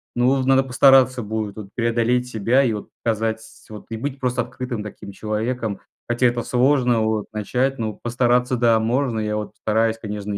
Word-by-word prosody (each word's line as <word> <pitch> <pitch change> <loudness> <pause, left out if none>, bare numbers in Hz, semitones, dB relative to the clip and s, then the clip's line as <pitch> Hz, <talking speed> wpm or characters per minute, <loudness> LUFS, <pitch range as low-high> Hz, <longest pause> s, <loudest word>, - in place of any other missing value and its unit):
Ну 120 +1 +2
вот, 135 0 +2
надо 135 0 +5
постараться 130 -1 +4
будет 110 -1 -4
вот 105 -3 -9
преодолеть 120 +1 +1
себя 120 +3 +2
и 120 - +1
вот 105 - -6
показать 110 0 -1 0.3
вот 105 -1 -10
и 115 - -4
быть 135 +3 -4
просто 125 -1 0
открытым 125 -4 -5
таким 100 -1 -9
человеком. 110 +1 -3 0.3
Хотя 120 +1 +2
это 120 -1 -1
сложно 125 -2 +2
вот 110 -1 0
начать, 125 +5 -1
но 110 -2 -2
постараться, 125 +1 +1
да, 115 -2 +3
можно. 120 0 0
Я 105 0 -2
вот 105 0 -4
постараюсь, 110 +1 0
конечно, 105 -2 -5
115 Hz, 180 wpm, -22 LUFS, 110-125 Hz, 0.3 s, надо